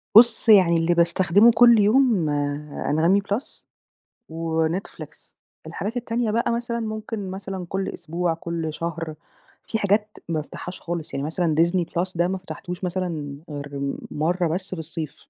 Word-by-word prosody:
بُص 235 0 +7
يعني 185 -5 +7
اللي 165 +1 +2
باستخدمه 180 +6 +5
كل 235 0 +6
يوم 215 -3 +4 0.6
Anghami 165 +7 +3
Plus 235 +7 -3 0.7
وNetflix، 165 +2 -3 0.3
الحاجات 225 +5 -4
التانية 235 -1 -1
بقى 230 +2 +1
مثلًا 235 0 -2
ممكن 215 -2 -4
مثلًا 190 -1 -6
كل 195 0 -2
أسبوع، 170 0 -2
كل 165 -1 -4
شهر، 165 -1 -4 0.5
في 220 - -1
حاجات 210 +1 +1
ما 165 - -1
بافتحهاش 180 +4 -8
خالص، 170 -2 -5
يعني 140 +2 -2
مثلًا 160 -1 0
Disney 170 +1 +3
Plus 180 +2 -1
ده 175 +1 +2
ما 190 +1 -2
فتحتوش 185 0 -7
مثلًا 170 -6 -3
غير 140 -1 -4 0.2
مرّة 170 +3 0
بس 185 +4 -3
في - - -8
الصيف، 155 -2 -6
180 Hz, 145 wpm, -24 LUFS, 165-210 Hz, 0.7 s, بُص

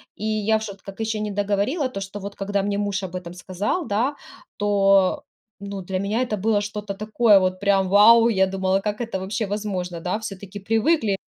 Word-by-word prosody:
И - - -9
я 215 0 +1
в 220 - -6
шот 200 -2 -8
как 195 +2 -11
ещё 220 -1 -2
не 210 -1 -3
договорила 205 - 0
то, 195 - -6
что 195 +1 -6
вот, 200 +1 -7
когда 200 0 -1
мне 200 0 -1
муж 200 -1 -2
об 185 -1 -6
этом 175 -1 -6
сказал, 195 - -3
да, 240 +8 0 0.4
то, 195 -2 +3 0.4
ну, 200 -1 -6
для 185 +1 -3
меня 210 +5 -1
это 215 -4 -2
было 210 +1 +1
что-то 205 -1 -5
такое 215 0 +4
вот 185 0 -1
прям 195 -2 +2
вау! 230 +3 +7
Я 190 -3 +3
думала, 190 0 0
как 210 +2 -3
это 225 -5 -3
вообще 205 +4 -2
возможно, 190 -4 -3
да. 180 +5 -2
Всё-таки 200 -1 -8
привыкли 225 - +1
200 Hz, 200 wpm, -23 LUFS, 195-215 Hz, 0.4 s, вау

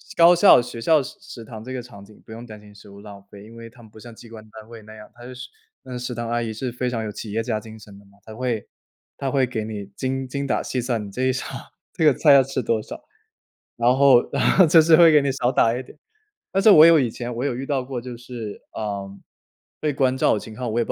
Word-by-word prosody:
高 170 +1 +6
校 175 -7 +6
学 120 -1 -8
校 155 +6 +3
食 130 - -10
食 115 - -11
堂 110 -1 -10
这 130 +2 -8
个 130 - -4
场 110 -5 -14
景， 105 +1 -19
不 - - -16
用 115 +2 -9
担 110 -3 -12
心 105 0 -17
食 100 - -16
物 100 0 -14
浪 100 -1 -12
费， 100 0 -13
因 115 +2 -15
为 115 0 -10
它 120 +1 -18
们 110 - -16
不 110 - -16
像 120 +1 -12
机 115 +1 -15
关 110 -1 -12
单 110 0 -13
位 115 -2 -12
那 110 +1 -14
样。 105 -1 -13
她 120 - -15
就 130 - -9
是 125 0 -10 0.3
那 130 - -10
个 - - -4
食 125 0 -5
堂 120 -1 -5
阿 120 0 -1
姨 110 -1 -4
是 125 +3 -5
非 125 +1 -4
常 115 -2 -3
有 105 - -5
企 105 0 -8
业 110 +2 -1
家 115 -2 -3
精 110 +1 -13
神 100 -1 -15
的 100 - -18
嘛， 100 0 -24
她 110 - -12
会 120 -3 -3 0.5
她 135 -1 -3
会 135 -2 +1
给 115 -3 -4
你 105 -2 -7
精 130 +2 -3
精 140 +2 -4
打 135 - -1
细 130 - -4
算， 120 -3 -2
你 100 - -9
这 125 +6 -4
一 130 0 +2
场 130 - -6 0.3
这 160 - 0
个 150 - +6
菜 145 +3 +4
要 135 -1 +6
吃 135 0 -4
多 110 0 0
少， - - -10 0.8
然 120 +2 +2
后 135 -3 +5
然 - - -1
后 190 - +7
就 160 +1 +6
是 160 +1 +5
会 170 -1 +7
给 150 -1 +5
你 140 -1 -1
少 125 -2 -1
打 115 -2 +2
一 130 - -6
点。 - - -17 0.5
但 195 - +1
是 220 - +7
我 155 -4 +8
有 165 -1 +6
以 125 -4 0
前 120 +1 -6
我 120 - -4
有 135 -4 -2
遇 130 +2 -5
到 135 -2 -2
过， 125 -1 -6
就 125 -1 -9
是， 120 -3 -9 0.2
嗯， 100 -2 -6 0.6
被 150 -1 -1
关 130 -1 0
照 - - +2
的 - - -3
情 110 0 -11
况。 120 0 -4
我 115 - -1
也 - - +2
不 - - -16
120 Hz, 315 characters per minute, -22 LUFS, 110-130 Hz, 0.8 s, 我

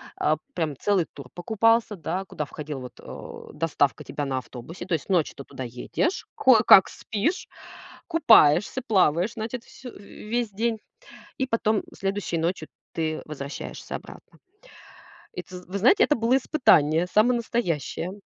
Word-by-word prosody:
а, - - +1 0.2
прям 155 -4 -2
целый 195 -5 +1
тур 140 -3 -10
покупался, 220 +4 +2
да, 175 +3 -3
куда 150 -5 -5
входила, 150 -2 -7
вот, 125 - -11
э, - - -10
доставка 145 -6 0
тебя 145 - -4
на 135 -1 -2
автобусе. 130 +8 -8
То 185 - -3
есть 160 +4 -2
ночью 175 -5 +1
ты 140 - -8
туда 130 - -8
едешь, 125 - -2
кое-как 220 -6 +7
спишь, 225 - -2 0.6
купаешься, 225 - +4
плаваешь, 185 - +2
значит, 230 +2 -5
вс 265 - -17
весь 230 0 -5
день, 225 +2 -1 0.6
и 265 - -1
потом, 220 -3 +1
м, - - -2
следующей 195 -3 -2
ночью 165 -1 -2 0.3
ты 155 -1 -2
возвращаешься 140 -2 -7
обратно. - - -12 1.0
И - - -5
ты, 180 - -11
з 180 - -11
вы 195 +2 -4
знаете, 250 - +5
это 295 - +2
было 235 +3 +2
испытание, 175 - +3
самое 240 +4 +4
настоящее. 180 - -2
190 Hz, 150 wpm, -25 LUFS, 155-225 Hz, 1.0 s, кое-как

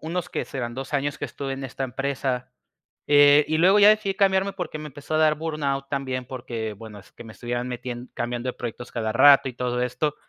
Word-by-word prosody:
unos, 170 +2 -4
¿qué - - -3
serán? 120 -4 -5
2 135 +2 -7
años 145 +1 -1
que - - -4
estuve 135 -1 -5
en 135 0 -5
esta 135 +1 -4
empresa, 130 -1 -3 0.6
eh, 145 0 +6
y 155 0 +1
luego 190 +4 +5
ya 205 +1 +8
decidí 215 -2 +1
cambiarme 195 0 +2
porque 180 -5 -5
me 150 - -7
empezó 145 +3 -7
a - - +3
dar 155 -1 +4
burnout 145 -4 -3
también, 130 -3 -3
porque 120 -4 -5
bueno, 105 0 -11
es - - -21
que 120 - -12
me 110 - -10
estuvieron 120 +2 -4
metien 125 0 -6
cambiando 120 +1 -3
de - - -1
proyectos 120 0 -7
cada 110 -2 -2
rato 135 +2 +6
y - - -6
todo 125 0 -2
esto. 125 +4 -1
135 Hz, 220 wpm, -24 LUFS, 125-150 Hz, 0.6 s, ya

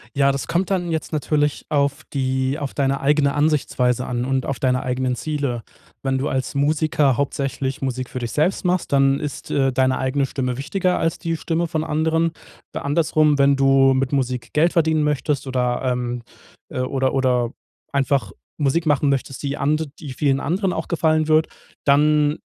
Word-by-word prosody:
Ja, 140 0 +4
das 140 - -4
kommt 175 +3 0
dann 175 -3 0
jetzt 160 0 -3
natürlich 150 -1 0
auf 140 +1 0
die 130 0 0
auf 140 -3 -4
deine 135 -1 0
eigene 140 0 +2
Ansichtsweise 135 -5 +1
an 120 0 -2
und 130 -1 0
auf 140 - -3
deine 125 -1 +1
eigenen 125 0 -1
Ziele. 140 -2 -2 0.4
Wenn 135 -1 0
du 135 +3 -1
als 130 +1 -2
Musiker 145 -2 +2
hauptsächlich 135 -1 -2
Musik 130 -1 -3
für 125 - -5
dich 120 -2 -4
selbst 180 +6 0
machst, 180 0 0
dann 135 0 +3
ist, 145 -1 -6
äh, 135 -1 +2
deine 130 0 +2
eigene 135 +1 0
Stimme 125 -2 -3
wichtiger 180 +6 0
als 165 0 -1
die 165 -1 -2
Stimme 170 +1 -1
von 160 -1 -2
anderen. 160 +1 +1 0.4
Andersrum, 150 0 +2
wenn 140 0 +4
du 135 0 +4
mit 130 0 0
Musik 125 -4 -2
Geld 165 +3 +3
verdienen 160 -2 +2
möchtest 150 -1 0
oder, 125 -1 0
ähm, 125 -1 -2 0.5
äh, - - -5
oder 130 0 0
oder 125 -3 +1 0.4
einfach 135 -7 0 0.3
Musik 155 +3 +1
machen 145 -1 +2
möchtest, 135 0 -2
die 140 0 -2
and 150 +2 0
die 145 -5 -7
vielen 135 0 +1
anderen 185 +5 -1
auch - - -4
gefallen 155 -2 +1
wird, 155 0 +4 0.4
dann 150 +1 +3
140 Hz, 175 wpm, -21 LUFS, 130-155 Hz, 0.5 s, Ja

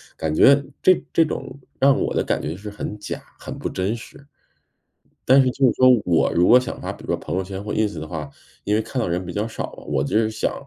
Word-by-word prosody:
感 80 -1 -2
觉 140 - +6 0.2
这 185 -2 +4
这 165 - +5
种 140 -2 -6 0.2
让 135 0 +4
我 - - -1
的 - - +1
感 - - -1
觉 80 +2 -4
是 105 +3 -8
很 105 0 -6
假， 105 - -6 0.2
很 - - -8
不 - - -4
真 95 +5 -2
实。 140 +4 -13 1.0
但 130 +2 +6
是 130 - +3
就 135 +2 +2
是 125 - +4
说 130 - +6 0.2
我 85 -2 +2
如 90 +1 +4
果 125 - +8
想 125 - -6
发， - - -4
比 - - -14
如 - - -11
说 - - +1
朋 80 +4 -5
友 95 - 0
圈 95 +1 -6
或 105 - -4
Ins 105 -6 -1
的 80 - -6
话， 75 -3 -5 0.4
因 105 - +1
为 110 - +2
看 130 - -6
到 115 - 0
的 85 - -2
人 90 +1 -2
比 90 - -6
较 105 +3 -2
少， 115 - -6 0.2
我 70 -2 0
就 100 +9 +1
是 110 - +2
想 110 - -2
105 Hz, 290 characters per minute, -22 LUFS, 90-130 Hz, 1.0 s, 果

